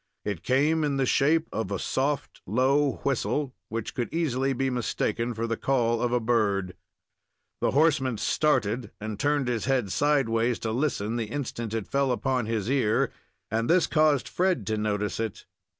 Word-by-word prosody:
It 100 -5 -3
came 150 +5 +2
in 145 -2 0
the 135 - +2
shape 160 +6 +3
of 110 -4 -2
a 100 - -1
soft 140 +7 -2
low 135 +6 +2
whistle, 135 +1 0 0.2
which 115 -1 -4
could 120 -3 -3
easily 135 -5 0
be 135 0 0
mistaken 120 -1 -1
for 115 +1 -2
the 115 0 -1
call 115 -4 +1
of 120 - 0
a 125 - +2
bird. 105 -5 +1 0.9
The - - +1
horseman 135 -5 +2
started 120 -5 +1
and 110 0 -5
turned 145 -2 +1
his 120 -3 -1
head 125 -7 +1
sidewise 125 -5 +2
to 110 - 0
listen 120 -4 -1
the 115 - -1
instant 120 -4 -4
it 110 -3 -3
fell 140 -1 +1
upon 125 -1 0
his 110 -3 -1
ear, 125 -5 +2 0.4
and 115 +1 0
this 175 0 +5
caused 155 -3 +2
Fred 180 - 0
to 110 - -1
notice 105 0 -1
it. 110 -3 -4
125 Hz, 170 wpm, -27 LUFS, 110-140 Hz, 0.9 s, this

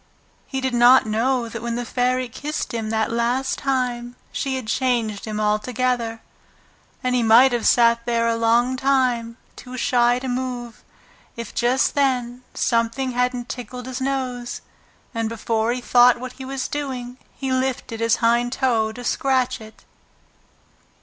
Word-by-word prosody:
He 265 -1 -3
did 260 -1 -1
not 245 +1 +6
know 235 +3 0
that 230 0 -7
when 235 0 -3
the 245 0 -3
Fairy 255 +1 0
kissed 295 +5 -5
him 225 -2 -3
that 220 +1 0
last 240 +3 0
time 250 -3 -1 0.2
she 270 -2 -2
had 260 -3 -4
changed 230 -3 -1
him 215 -1 -4
altogether. 225 +2 0 0.8
And 255 0 0
he 250 - +2
might 235 +4 +6
have 240 -2 0
sat 235 0 +4
there 230 -1 +1
a 230 - +1
long 235 +3 +2
time, 250 -4 +1 0.2
too 255 0 -9
shy 245 -1 +3
to 260 +1 -5
move, 245 -2 -4 0.5
if 235 -2 -7
just 245 +2 +2
then 250 -3 0
something 235 +3 0
hadn't 250 0 -1
tickled 250 -1 -7
his 260 0 -5
nose, 255 -2 -3 0.5
and 230 -2 -1
before 225 0 -1
he 250 +1 -3
thought 245 0 +5
what 255 0 -7
he 265 - -9
was 265 0 -3
doing 255 -4 -5 0.2
he 270 -2 -3
lifted 260 -3 -2
his 230 -1 +3
hind 240 +1 +2
toe 230 -5 +1
to 245 +2 -9
scratch 255 -1 0
it. 220 0 -14
245 Hz, 155 wpm, -22 LUFS, 230-255 Hz, 0.8 s, not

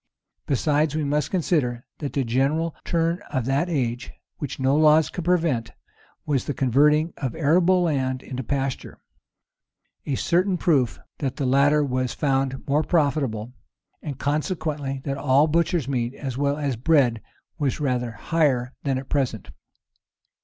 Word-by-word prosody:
Besides, 150 +2 +1
we 155 - 0
must 145 0 0
consider, 145 -9 0
that 145 -3 -4
the 140 - +1
general 140 +7 0
turn 165 +1 0
of 130 -5 -2
that 140 +7 0
age, 125 -5 -2 0.3
which 145 -3 -5
no 135 +1 +2
laws 155 0 +5
could 175 - -5
prevent, 165 -10 +1 0.5
was 140 -4 0
the 145 - -3
converting 150 +5 +3
of 130 -5 -3
arable 175 +4 +3
land 130 -5 -1
into 130 -1 -5
pasture; 135 +1 -3 1.1
a 140 - 0
certain 180 +6 +1
proof 140 -10 +2 0.2
that 135 -3 -2
the 140 - -2
latter 140 +3 +4
was 130 -2 -2
found 135 -2 -1
more 145 +2 +2
profitable, 135 -9 0 0.5
and 145 -5 -6
consequently 150 -2 -2
that 140 -1 -3
all 140 +1 +4
butcher's 165 -2 +1
meat, 125 -2 -2
as 135 -4 -5
well 140 +1 0
as 140 -4 -1
bread, 125 -4 +2 0.4
was 140 -2 -1
rather 125 -4 0
higher 130 -3 0
than 135 -2 -1
at 130 0 -6
present. 130 -7 -2
140 Hz, 145 wpm, -24 LUFS, 130-155 Hz, 1.1 s, laws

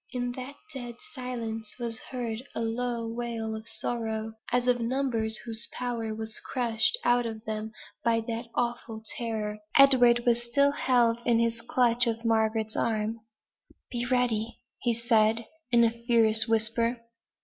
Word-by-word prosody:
In 245 -1 -2
that 255 +3 -7 0.2
dead 245 -3 -6 0.2
silence 230 -4 -5
was 235 -2 -4
heard 235 -3 -4
a - - -2
low 230 0 -2
wail 230 -1 -3
of 220 +1 -8
sorrow, 225 -2 -3 0.2
as 245 0 +2
of 245 -1 +3
numbers 230 -3 +2
whose 225 -1 -1
power 235 -3 -3
was 220 0 -4
crushed 240 - +1
out 240 0 +3
of 220 0 -7
them 215 0 -4 0.3
by 230 -1 +2
that 230 +1 -4
awful 235 -2 -2
terror. 220 -5 -3 0.2
Edward 245 -3 +6
still 250 +4 +2
held 240 -4 +2
his 230 -1 +2
clutch 240 0 +3
of 230 0 -2
Margaret's 220 -1 +1
arm. 220 0 -1 0.7
"Be 240 -1 -2
ready!" 235 -3 0 0.5
said 220 -2 +4
he, 230 - -5 0.3
in 235 - +7
a 230 - +4
fierce 230 -1 +3
whisper. 230 +2 +1
230 Hz, 140 wpm, -28 LUFS, 225-245 Hz, 0.7 s, in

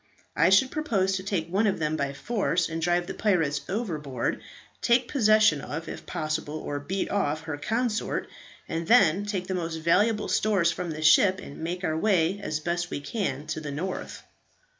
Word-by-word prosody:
I 165 +3 +4
should 200 +8 +4
propose 210 -12 0
to 190 - -6
take 190 -5 -2
one 200 +5 +1
of 195 - +1
them 155 0 -1
by 140 -2 -1
force, 175 +3 -1
and 165 0 -4
drive 175 +1 +1
the - - -5
pirates 165 -9 +1
overboard; 155 - -2 0.4
take 240 +2 +3
possession 215 - +4
of, 160 +4 -6
if - - -8
possible, 155 -1 -3
or 145 -2 -4
beat 185 +7 -3
off, 155 -6 0
her 160 -2 -5
consort; 225 +8 -1 0.4
and 165 0 -3
then 205 -4 +4
take 190 -3 -2
the 185 - -3
most 165 -2 -3
valuable 205 +7 +2
stores 195 -6 +2
from 175 +1 -4
the 155 -1 -5
ship, 185 +5 +5
and 140 - -10
make 175 +3 -4
our 155 -3 0
way 185 0 +2
as 155 -4 -2
best 170 +1 -2
we - - -3
can 145 - -3
to 155 0 -3
the 150 - -5
north." 170 +7 -5
175 Hz, 185 wpm, -27 LUFS, 155-200 Hz, 0.4 s, ship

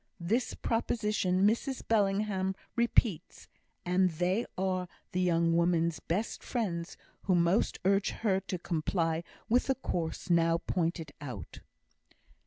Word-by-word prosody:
This 215 +9 0
proposition, 210 -5 +1
Mrs 235 +5 0
Bellingham 195 -2 +1 0.2
repeats; 235 -6 +1 0.4
and 180 +1 +3
they 180 +7 0
are 185 -1 0 0.2
the 185 - 0
young 170 -2 +2
woman's 170 -1 +2
best 200 +7 -2
friends 180 -8 -3 0.3
who 185 - +3
most 175 +4 +2
urge 195 +1 +3
her 195 -4 0
to 190 - -4
comply 165 -1 -1 0.2
with 245 +3 +2
the 265 - +2
course 175 -10 -3
now 165 -1 +4
pointed 165 -3 -2
out. 125 - -7
185 Hz, 120 wpm, -31 LUFS, 170-210 Hz, 0.4 s, now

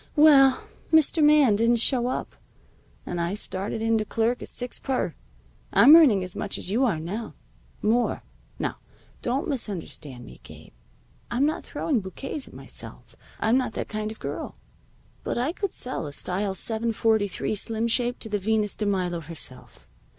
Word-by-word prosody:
Well, 275 -4 +6 0.3
Mr. 315 0 +4
Man 295 -7 +6
didn't 230 +3 +3
show 240 +1 +2
up, 255 - -2 0.8
and 175 -1 -3
I 170 +3 -1
started 205 +1 -3
in 225 0 +2
to - - 0
clerk 230 +3 0
at - - -7
six 245 0 -5
per. 265 -2 -1 0.6
I'm 295 - +8
earning 255 - +6
as 180 -1 -5
much 205 - -2
as 185 - -5
you 245 +6 +3
are 195 -10 0
now. 200 +8 -5 0.5
More. 235 +3 +1 0.3
Now, - - -3 0.4
don't 255 +4 -1
misunderstand 175 - -5
me, 60 - -13
Gabe. - - -14 0.6
I'm 255 +4 +2
not 310 - -1
throwing 285 -7 -1
bouquets 260 +9 -5
at - - -15
myself. - - -10 0.2
I'm 230 +4 +3
not 255 - -3
that - - -4
kind 215 0 -3
of 220 - -10
a - - -29
girl. - - -5 0.7
But - - -2
I 260 +7 0
could 400 -1 -3
sell 250 -11 -4
a 145 - -8
style 190 +5 -2
743 220 -1 0
Slimshape 230 +3 0
to 220 - -4
the 205 -1 -1
Venus 210 +1 0
de 210 - -2
Milo 180 -3 0
herself. 155 -5 -8
225 Hz, 165 wpm, -25 LUFS, 200-255 Hz, 0.8 s, I'm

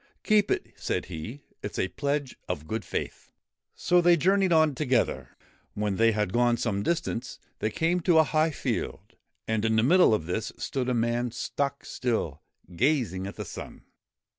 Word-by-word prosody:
' - - -42
Keep 210 -2 +3
it,' - - -2
said - - -2
he; 110 - -7
' - - -37
it - - -6
's - - -5
a - - +1
pledge 140 - -2
of 80 -4 -3
good 110 +4 -3
faith.' - - -5 0.4
So 180 0 +3
they 175 0 +5
journeyed 190 +3 +3
on 155 -2 +4
together. 130 -3 0 0.4
When 105 -2 -1
they 115 0 +5
had 105 -3 -1
gone 120 0 +3
some 105 -4 -1
distance, 160 -3 -2 0.2
they 110 - 0
came 165 +9 +1
to 170 -1 +3
a 160 - +8
high 155 +1 +2
field, 150 - -4 0.3
and 110 -1 0
in 110 0 +2
the 110 - +3
middle 170 -4 +5
of 80 - -4
this 95 +6 -2
stood 130 -2 -2
a 125 - +1
man 120 +1 0
stock 140 +4 -3
still, 110 - -2 0.3
gazing 110 - +1
at 100 - -7
the - - -6
sun. - - -9
125 Hz, 190 wpm, -27 LUFS, 110-155 Hz, 0.4 s, a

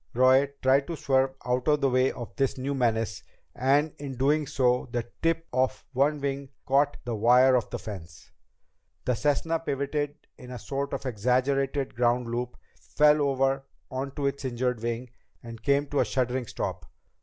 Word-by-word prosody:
Roy 130 +2 +5
tried 135 +1 +4
to 170 - -3
swerve 135 -2 +1
out 125 0 0
of 150 -1 +4
the 135 - +3
way 130 +1 +3
of 120 -2 -8
this 135 -1 0
new 135 +2 -2
menace, 115 -5 0 0.3
and 145 +4 +2
in 140 -2 -6
doing 145 +3 +2
so 125 -2 +1
the 120 -1 -2
tip 165 0 +1
of 130 +1 0
one 145 +3 +2
wing 140 -1 -3 0.2
caught 140 +2 +2
the 120 - -2
wire 125 +4 +5
of 120 -4 0
the - - -4
fence. 85 -6 -10 0.7
The 125 - +2
Cessna 150 +6 0
pivoted 145 -1 -2 0.2
in 125 - -11
a 125 - -6
sort 140 +4 -4
of - - -4
exaggerated 130 +4 0
ground 120 0 +1
loop, 120 +1 -3 0.2
fell 150 0 +3
over 135 -1 +1 0.3
onto 140 +2 -3
its 140 0 -1
injured 125 -2 -1
wing, 120 +1 -3 0.3
and 115 -1 -9
came 140 +3 +2
to 145 - 0
a - - +3
shuddering 125 +2 -1
stop. - - -4
130 Hz, 170 wpm, -27 LUFS, 125-140 Hz, 0.7 s, Roy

